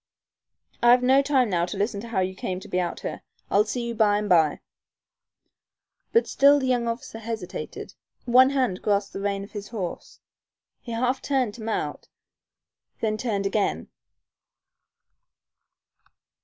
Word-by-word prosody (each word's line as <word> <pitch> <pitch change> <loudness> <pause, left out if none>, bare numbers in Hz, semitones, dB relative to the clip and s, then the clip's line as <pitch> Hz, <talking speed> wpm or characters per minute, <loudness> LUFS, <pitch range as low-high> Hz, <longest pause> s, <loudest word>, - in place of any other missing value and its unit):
"I've 245 +1 +6
no 265 +2 +5
time 265 -5 +2
now 170 -1 +1
to 195 - -5
listen 205 0 -1
to 235 - -8
how 215 -5 0
you 185 0 -1
came 185 -1 -4
to - - -11
be 180 - -1
out 175 -1 -3
here. - - -5 0.3
I'll 205 +1 +4
see 235 +2 -3
you 235 - -3
by 215 -2 +3
and 210 0 -2
by." 160 -5 +3 1.5
But 460 - +3
still 280 +1 +5
the 270 - -1
young 245 -2 +1
officer 230 -1 -5
hesitated. 225 -5 -6 0.3
One 255 +2 +6
hand 255 -9 0
grasped 200 -1 0
the 195 - -5
rein 200 -1 -1
of 200 - -12
his 205 -1 -7
horse. 195 -7 -6 0.6
He 235 - -8
half 250 +3 0
turned 260 -6 0
to 225 - -11
mount, 220 0 -3 0.9
then 215 -1 0
turned 210 -3 -2
again. 200 +1 -1
220 Hz, 155 wpm, -25 LUFS, 200-250 Hz, 1.5 s, I've